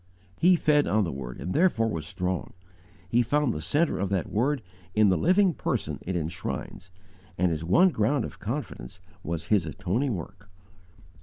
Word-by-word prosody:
He 180 +2 +6
fed 150 -3 +3
on 110 0 +2
the 85 - -2
Word 65 -2 -7
and 90 - -4
therefore 155 -10 +3
was 80 -8 -4
strong. 90 -3 -3 0.5
He 120 +6 +3
found 145 +2 +1
the 75 - -5
centre 150 - +1
of 100 0 -1
that 95 -4 -1
Word 130 +4 0 0.3
in 105 -1 +5
the 95 - +3
living 185 - +3
Person - - -2
it 95 - -4
enshrines, 85 +2 -4 0.5
and 90 -1 +2
his 80 0 -2
one 100 - +5
ground 115 -2 +1
of - - -9
confidence 115 - -5 0.2
was 80 0 -4
His 100 -7 +3
atoning 100 - -1
work. 95 +3 -9
105 Hz, 170 wpm, -27 LUFS, 85-145 Hz, 0.5 s, He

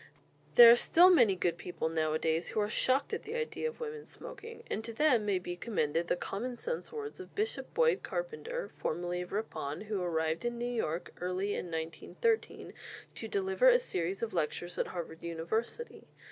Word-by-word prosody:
There 235 -1 +11
are - - +9
still 350 +9 +6
many 240 - +5
good 175 -1 -1
people 170 -1 -3
nowadays 160 +1 0
who - - -2
are 210 0 0
shocked 260 +5 +1
at - - -1
the 440 +2 -6
idea 470 0 -2
of 470 - -7
women 450 -2 -6
smoking; 460 0 -10
and 220 - -3
to 230 - -5
them 240 -4 +3
may 200 -2 +2
be 180 -1 -5
commended 170 -4 -1
the - - +2
common 235 +7 -4
sense 480 - -4
words 435 -3 -6
of 375 - -11
Bishop 430 +2 -2
Boyd 480 -1 +3
Carpenter, - - -4
formerly 175 +2 -2
of 180 - -8
Ripon, 175 -8 -3
who 210 -2 -3
arrived 160 -2 0
in 240 0 -2
New 240 - -2
York 220 -9 -2
early 185 +3 -1
in - - -3
1913 165 - -2 0.4
to - - -5
deliver 395 +4 +3
a - - +7
series 195 - -2
of 230 - -2
lectures 175 +1 -2
at - - +1
Harvard 165 -2 -6
University. 170 - -3
215 Hz, 185 wpm, -32 LUFS, -, 0.4 s, There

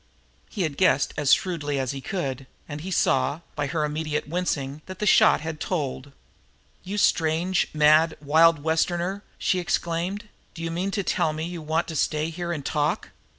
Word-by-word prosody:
He 195 - -2
had 155 -4 -3
guessed 185 -7 +3
as 145 -2 +1
shrewdly 150 -6 +1
as 130 -2 -1
he 135 -1 -6
could, 135 -6 -4 0.2
and 145 -1 -6
he 185 - -6
saw, 160 -3 +1
by 145 -1 -1
her 155 +1 -1
immediate 150 0 -2
wincing, 150 -4 -2
that 185 -1 -8
the 210 - -2
shot 180 - +5
had 160 -1 -5
told. 140 -5 -3 0.7
"You 195 +3 -5
strange, 170 0 +2
mad, 155 +2 +4
wild 155 +1 +4
Westerner!" 175 +4 0 0.2
she 185 - +1
exclaimed. 175 +4 -2 0.3
"Do 165 - -7
you 165 - -2
mean 180 +4 -2
to 200 0 -2
tell 155 -3 0
me 155 +1 -3
you 175 -1 -6
want 160 +2 -1
to 160 - -6
stay 155 +2 0
here 175 +1 -4
and 150 -5 -4
talk? 150 +6 -1
160 Hz, 180 wpm, -25 LUFS, 150-175 Hz, 0.7 s, shot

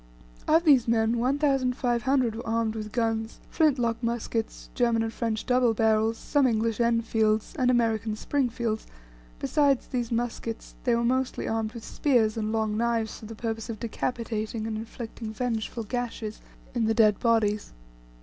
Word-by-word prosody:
Of 325 +2 +5
these 275 -8 +5
men 230 0 +2
1,500 255 -2 +1
were 235 - -7
armed 225 -1 0
with 215 -1 -5
guns 225 -1 -1
flint 310 -4 +3
lock 235 -1 -1
muskets, 230 -1 -3
German 235 -2 +2
and 225 0 -3
French 225 -2 -2
double 250 -2 +3
barrels, 220 +1 +2
some 285 +1 +2
English 225 -1 0
Enfields, 225 -2 +1
and 250 -1 +3
American 225 -3 +1
Springfields 235 -3 -1 0.5
besides 280 - +2
these 245 -3 -3
muskets, 230 -1 -3
they 240 -2 +3
were 235 - 0
mostly 260 +2 0
armed 225 0 -1
with 235 - -8
spears 235 -7 +2
and 215 -1 -2
long 220 -1 0
knives 230 -1 0
for 215 - -10
the 225 - -8
purpose 225 0 -4
of 220 -2 -5
decapitating, 225 -2 -3
and 225 -1 -3
inflicting 225 0 -6
vengeful 230 0 -2
gashes 225 -2 -4 0.3
in 235 -3 +1
the 225 0 +1
dead 215 -3 +4
bodies. 215 -3 +1
230 Hz, 155 wpm, -27 LUFS, 220-245 Hz, 0.5 s, Of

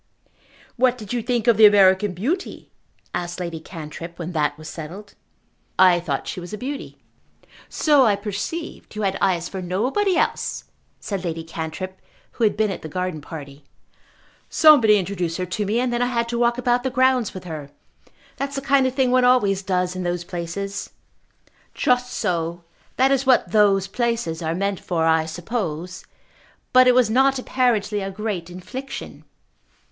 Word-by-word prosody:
"What 250 0 +3
did 215 -1 -7
you 240 - 0
think 235 -1 -1
of 235 -3 +4
the 215 -1 +9
American 195 -1 +4
beauty?" 295 - -3 0.4
asked 175 +1 -4
Lady 170 -2 -4
Cantrip 165 +1 -9
when 175 0 -5
that 150 -3 0
was 155 0 -10
settled. 180 +7 -8 0.6
"I 185 -2 +6
thought 150 -6 -3
she - - -4
was 175 +1 -9
a - - -3
beauty." 275 +5 -6 0.7
"So 295 -4 +4
I 215 -4 +4
perceived. 210 - -5
You 215 - -3
had 195 -1 0
eyes 175 -3 +1
for 190 - -6
nobody 255 - 0
else," - - -1 0.4
said 195 -3 -4
Lady 165 -2 -3
Cantrip, 165 +4 -6 0.3
who 235 - -3
had 210 - +2
been 215 -1 +1
at 185 - -6
the 155 - -7
garden 180 -2 -3
party. 145 -2 -10 0.9
"Somebody 245 -9 +6
introduced 180 -3 -2
her 185 - -2
to 195 +3 -3
me, 220 +4 +1
and 250 -1 0
then 240 - 0
I 245 - +2
had 235 -1 -1
to 235 0 -2
walk 235 0 +2
about 245 0 +1
the 260 - -1
grounds 255 -4 +2
with 185 - -7
her. 155 -5 -7 0.7
That's 280 0 -3
the 275 - -2
kind 275 -1 +3
of 260 - -4
thing 260 -2 +2
one 255 0 +4
always 210 -6 +3
does 180 -1 -1
in 185 - -4
those 175 -1 -2
places." 185 +3 -5 0.9
"Just 250 0 +1
so. 170 0 -2 0.3
That 265 +1 +3
is 270 -1 +1
what 255 - +4
'those 200 -3 +4
places' 210 -6 -2
are 160 0 -1
meant 200 +1 -1
for, 165 -3 -1
I 160 0 +3
suppose. 175 -1 -4 0.7
But 255 0 +7
it 250 - +5
was 250 -4 +4
not 270 +3 +3
apparently 225 -5 0
a 195 - -3
great 195 -4 -4
infliction." 185 +10 -8
200 Hz, 175 wpm, -22 LUFS, 175-245 Hz, 0.9 s, the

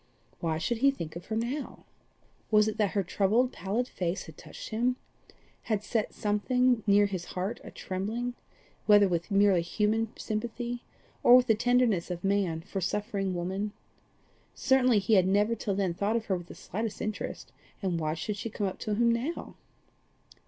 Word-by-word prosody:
Why 160 -2 -1
should 225 +9 -1
he 275 +3 +5
think 170 - -4
of 170 +1 -8
her 220 - -2
now? 245 +6 -3 0.6
Was 210 -1 +5
it 215 - -2
that 210 -3 +1
her 200 - +1
troubled 210 +7 +2
pallid 220 +6 -1
face 180 -3 -2
had 160 - -12
touched - - -10
him 240 +3 +1 0.7
had 210 -2 +1
set 220 0 -1
something 245 +3 +1
near 205 0 +6
his 185 -3 -3
heart 190 +4 -2
a - - -8
trembling, 220 +6 -3 0.5
whether 205 -1 +7
with 170 -2 -2
merely 195 -3 +4
human 215 +5 0
sympathy 240 +2 -3 0.4
or 240 - +8
with 250 0 +6
the 225 - +4
tenderness 235 -5 +2
of 175 -1 -5
man 195 -5 +1
for 195 +2 -5
suffering 195 0 -1
woman? 190 +4 -2 0.8
Certainly 255 -3 +4
he 205 +2 +1
had 185 -3 +5
never 205 +4 +3
till 205 -3 -2
then 190 -3 0
thought 205 +5 0
of 230 -1 -1
her 190 - 0
with 175 -1 -7
the - - -10
slightest 220 +2 -4
interest, 215 -1 -4 0.3
and 180 -3 0
why 155 -1 -1
should 205 +6 -3
she 230 - -4
come 210 -1 -3
up 190 - -3
to 210 - -2
him 235 +2 +3
now? 250 +9 -3
210 Hz, 180 wpm, -29 LUFS, 190-230 Hz, 0.8 s, or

